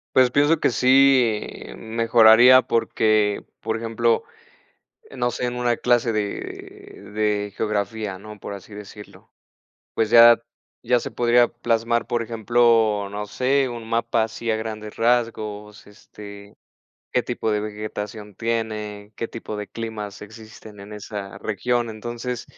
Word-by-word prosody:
Pues, 130 Hz, -1 st, +5 dB
pienso 145 Hz, +4 st, +3 dB
que -, -, +3 dB
sí 130 Hz, -3 st, +3 dB, 0.3 s
mejoraría 115 Hz, +2 st, +6 dB
porque, 110 Hz, -3 st, +1 dB, 0.2 s
por 110 Hz, 0 st, -2 dB
ejemplo, 115 Hz, 0 st, 0 dB, 0.9 s
no 120 Hz, -2 st, -2 dB
sé, 125 Hz, -, -3 dB
en 120 Hz, 0 st, -4 dB
una 120 Hz, -1 st, 0 dB
clase 120 Hz, -1 st, +1 dB
de 105 Hz, 0 st, -6 dB
de 105 Hz, -1 st, -1 dB
geografía, 105 Hz, -2 st, -2 dB
¿no? 105 Hz, +1 st, -11 dB
Por 100 Hz, -, -8 dB
así 100 Hz, +2 st, -12 dB
decirlo, 105 Hz, 0 st, -12 dB, 0.6 s
pues, 110 Hz, -1 st, 0 dB
ya 115 Hz, 0 st, +8 dB, 0.4 s
ya 125 Hz, -1 st, +1 dB
se -, -, -6 dB
podría 120 Hz, 0 st, +3 dB
plasmar, 115 Hz, 0 st, -1 dB
por 120 Hz, -1 st, -1 dB
ejemplo, 115 Hz, -2 st, +2 dB
no 105 Hz, 0 st, -4 dB
sé, 130 Hz, +4 st, +1 dB
un 115 Hz, -2 st, -8 dB
mapa 115 Hz, 0 st, +1 dB
así, 115 Hz, +1 st, -5 dB
a -, -, +1 dB
grandes 110 Hz, -1 st, -6 dB
rasgos, 110 Hz, -3 st, -1 dB
este, 100 Hz, -1 st, -13 dB, 0.6 s
¿qué 125 Hz, -, +3 dB
tipo 120 Hz, -2 st, -3 dB
de 105 Hz, 0 st, 0 dB
vegetación 105 Hz, -1 st, -6 dB
tiene, 105 Hz, -2 st, -4 dB
qué 115 Hz, -, -3 dB
tipo 110 Hz, -2 st, -7 dB
de 105 Hz, -1 st, -6 dB
climas 110 Hz, -3 st, -6 dB
existen 110 Hz, -1 st, -13 dB
en 105 Hz, +1 st, -11 dB
esa 100 Hz, -1 st, -7 dB
región? 120 Hz, +3 st, -1 dB
Entonces, 120 Hz, +2 st, -5 dB
110 Hz, 135 wpm, -22 LUFS, 105-120 Hz, 0.9 s, ya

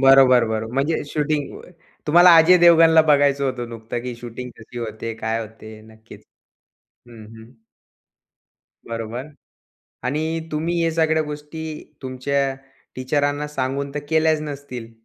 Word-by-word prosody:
बरोबर, 135 Hz, -2 st, +6 dB
बरोबर. 110 Hz, +1 st, -3 dB
म्हणजे 140 Hz, +4 st, 0 dB
शूटिंग, 150 Hz, -1 st, -2 dB
व -, -, -12 dB, 0.4 s
तुम्हाला 175 Hz, +3 st, +7 dB
अजय 165 Hz, +3 st, +7 dB
देवगणला 165 Hz, -2 st, +6 dB
बघायचं 140 Hz, -1 st, +3 dB
होतं 125 Hz, -3 st, -3 dB
नुकता 115 Hz, 0 st, -6 dB
की 125 Hz, +1 st, -6 dB
शूटिंग 120 Hz, +1 st, -8 dB
कशी 115 Hz, +2 st, -10 dB
होते? 115 Hz, 0 st, -5 dB
काय 110 Hz, +1 st, -2 dB
होते? 110 Hz, 0 st, -11 dB
नक्कीच 110 Hz, +1 st, -16 dB, 0.8 s
हं, 115 Hz, -3 st, -13 dB
हं. 110 Hz, +1 st, -14 dB, 1.4 s
बरोबर. 115 Hz, +4 st, -5 dB, 0.8 s
आणि 145 Hz, +5 st, -1 dB, 0.3 s
तुम्ही 165 Hz, +3 st, -1 dB
या 165 Hz, -, +1 dB
सगळ्या 160 Hz, -1 st, +2 dB
गोष्टी 150 Hz, +1 st, -8 dB, 0.4 s
तुमच्या 135 Hz, +1 st, -1 dB, 0.4 s
टीचरांना 145 Hz, +3 st, -1 dB
सांगून 140 Hz, -1 st, -3 dB
तर -, -, -1 dB
केल्याच 160 Hz, -1 st, +2 dB
नसतील? 140 Hz, -6 st, -7 dB
135 Hz, 130 wpm, -21 LUFS, 115-150 Hz, 1.4 s, तुम्हाला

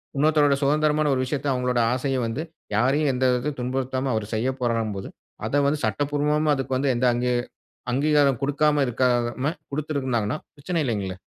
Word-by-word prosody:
இன்னொருத்தருடைய 145 Hz, -1 st, +3 dB
சுதந்திரமான 150 Hz, +1 st, +2 dB
ஒரு 130 Hz, -, 0 dB
விஷயத்த, 145 Hz, +2 st, -3 dB
அங்ககளுடைய 125 Hz, -1 st, +1 dB
ஆசைய 130 Hz, +1 st, -1 dB
வந்து 115 Hz, +6 st, -3 dB, 0.3 s
யாரையும் 135 Hz, +6 st, +2 dB
எந்த 125 Hz, +1 st, -1 dB
விதத்தையும் 125 Hz, +4 st, -1 dB
துன்புறுத்தாம 130 Hz, +1 st, -2 dB
அவரு 110 Hz, -2 st, -2 dB
செய்யப்போறார்ன்னும் 115 Hz, -3 st, -1 dB
போது, 95 Hz, -, -6 dB, 0.4 s
அத 145 Hz, 0 st, +2 dB
வந்து 145 Hz, +1 st, 0 dB
சட்டபூர்வமா 145 Hz, +6 st, +1 dB
அதுக்கு 135 Hz, -1 st, -2 dB
வந்து 135 Hz, +1 st, +1 dB
எந்த 120 Hz, +2 st, +1 dB
அங்கி 125 Hz, +1 st, 0 dB, 0.6 s
அங்கீகாரம் 140 Hz, -1 st, +3 dB
குடுக்காம 145 Hz, +1 st, +2 dB
இருக்காம 125 Hz, +2 st, +1 dB, 0.2 s
குடுத்துருந்தாங்கன்னா, 140 Hz, -5 st, -1 dB, 0.2 s
பிரச்சனை 165 Hz, +4 st, -3 dB
இல்லைங்களே. 100 Hz, -6 st, -2 dB
135 Hz, 145 wpm, -24 LUFS, 125-145 Hz, 0.6 s, இன்னொருத்தருடைய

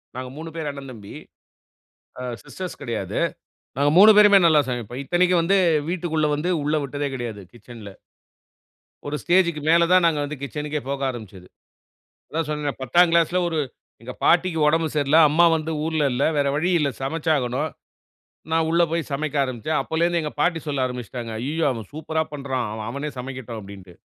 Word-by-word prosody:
நாங்க 130 Hz, 0 st, -5 dB
3 165 Hz, +1 st, -7 dB
பேர் 155 Hz, -3 st, -3 dB
அண்ணன் 135 Hz, -2 st, -9 dB
தம்பி. 105 Hz, -4 st, -11 dB, 1.1 s
ஆ -, -, -5 dB, 0.2 s
சிஸ்டர்ஸ் 185 Hz, -2 st, -7 dB
கெடையாது. 115 Hz, -, -3 dB, 0.6 s
நாங்க 145 Hz, +1 st, +2 dB
3 215 Hz, +2 st, +9 dB
பேருமே 205 Hz, -1 st, +8 dB
நல்லா 155 Hz, -2 st, +5 dB
சமைப்போம். 120 Hz, +1 st, -4 dB
இத்தனைக்கும் 175 Hz, +4 st, +2 dB
வந்து, 195 Hz, +4 st, +3 dB, 0.3 s
வீட்டுக்குள்ள 160 Hz, -3 st, -1 dB
வந்து 155 Hz, +5 st, -2 dB
உள்ள 150 Hz, +2 st, 0 dB
வுட்டதே 140 Hz, +1 st, -3 dB
கெடையாது, 115 Hz, -5 st, -5 dB
கிச்சன்ல. 115 Hz, -3 st, -11 dB, 1.2 s
ஒரு 145 Hz, -, -2 dB
ஸ்டேஜ்க்கு 170 Hz, -3 st, +2 dB
மேல 170 Hz, 0 st, +5 dB
தான் 185 Hz, -1 st, +5 dB
நாங்க 155 Hz, -3 st, +2 dB
வந்து 145 Hz, -1 st, -6 dB
கிச்சனுக்கே 150 Hz, +1 st, -4 dB
போக 140 Hz, 0 st, -3 dB
ஆரம்பிச்சது. 100 Hz, -6 st, -11 dB, 0.8 s
அதான் 160 Hz, 0 st, -2 dB
சொன்னேனே, 150 Hz, -1 st, -2 dB
10ங்கிளாஸ்ல 170 Hz, +5 st, +3 dB
ஒரு 160 Hz, -2 st, -2 dB, 0.4 s
எங்க 125 Hz, +2 st, -7 dB
பாட்டிக்கு 170 Hz, -1 st, +3 dB
ஒடம்பு 160 Hz, +1 st, +1 dB
சரியில்ல, 145 Hz, +1 st, +3 dB
அம்மா 170 Hz, +3 st, +5 dB
வந்து 160 Hz, +1 st, -4 dB
ஊர்ல 160 Hz, -2 st, 0 dB
இல்ல. 130 Hz, +3 st, 0 dB
வேற 140 Hz, -1 st, +2 dB
வழி 175 Hz, +4 st, 0 dB
இல்ல 140 Hz, -, +1 dB
சமைச்சாகணும். 150 Hz, -2 st, -1 dB, 0.8 s
நான் 160 Hz, 0 st, +2 dB
உள்ள 170 Hz, +1 st, +3 dB
போய் 165 Hz, -2 st, -2 dB
சமைக்க 150 Hz, +1 st, -2 dB
ஆரம்பிச்சேன். 130 Hz, +4 st, -2 dB
அப்போலேருந்து 170 Hz, +3 st, 0 dB
எங்க 150 Hz, -, -4 dB
பாட்டி 170 Hz, +1 st, +2 dB
சொல்ல 140 Hz, -3 st, 0 dB
ஆரம்பிச்சுட்டாங்க. 125 Hz, -1 st, -6 dB
"அய்யயோ! 155 Hz, +6 st, -1 dB
அவன் 110 Hz, -5 st, -8 dB
சூப்பரா 160 Hz, +1 st, -2 dB
பண்ணுறான். 135 Hz, -4 st, -3 dB
அவன் 110 Hz, 0 st, -5 dB
அவனே 140 Hz, +4 st, -4 dB
சமைக்கட்டும்." 125 Hz, -3 st, -6 dB
அப்படீன்ட்டு. 95 Hz, -3 st, -12 dB
150 Hz, 160 wpm, -23 LUFS, 125-165 Hz, 1.2 s, 3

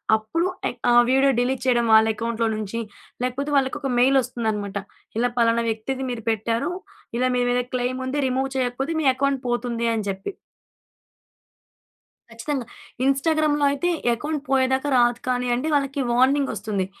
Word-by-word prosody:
అప్పుడు 220 Hz, +11 st, -1 dB, 0.2 s
ఏక్ 245 Hz, -, -10 dB
ఆ -, -, +5 dB, 0.2 s
video 270 Hz, +1 st, +4 dB
delete 250 Hz, 0 st, 0 dB
చేయడం 240 Hz, -2 st, +3 dB
వాళ్ళ 220 Hz, 0 st, +7 dB
అకౌంట్‌లో 230 Hz, 0 st, -1 dB
నుంచి, 215 Hz, +1 st, -4 dB, 0.4 s
లేకపోతే 265 Hz, +4 st, -2 dB
వాళ్ళకి 265 Hz, -1 st, +1 dB
ఒక 275 Hz, -, -2 dB
మెయిల్ 265 Hz, +2 st, +4 dB
వస్తుందనమాట. 215 Hz, -5 st, -3 dB, 0.4 s
ఇలా 245 Hz, +2 st, +2 dB
పలానా 235 Hz, 0 st, +3 dB
వ్యక్తిది 255 Hz, +5 st, -3 dB
మీరు 225 Hz, -3 st, -5 dB
పెట్టారు. 225 Hz, -, -1 dB, 0.5 s
ఇలా 255 Hz, +1 st, +2 dB
మీ 245 Hz, -, +2 dB
మీద 245 Hz, 0 st, +2 dB
క్లెమ్ 255 Hz, +1 st, -1 dB
ఉంది. 270 Hz, +3 st, -2 dB
రిమూవ్ 265 Hz, +1 st, -1 dB
చేయకపోతే 260 Hz, +4 st, -1 dB
మీ -, -, -2 dB
అకౌంట్ 275 Hz, 0 st, 0 dB
పోతుంది 240 Hz, -1 st, -1 dB
అని 215 Hz, -2 st, -2 dB
చెప్పి. 195 Hz, -, -4 dB, 2.0 s
ఖచ్చితంగా. 245 Hz, +3 st, -3 dB, 0.4 s
ఇన్‌స్టాగ్రామ్‍లో 295 Hz, +1 st, +2 dB
అయితే 285 Hz, +5 st, -1 dB, 0.3 s
అకౌంట్ 300 Hz, +3 st, -3 dB
పోయేదాకా 265 Hz, +1 st, +2 dB
రాదు 240 Hz, 0 st, +3 dB
కానియండి 250 Hz, +3 st, 0 dB
వాళ్ళకి 275 Hz, 0 st, 0 dB
వార్నింగ్ 265 Hz, +3 st, +3 dB
వస్తుంది. 205 Hz, -3 st, -2 dB
250 Hz, 145 wpm, -23 LUFS, 230-275 Hz, 2.0 s, వాళ్ళ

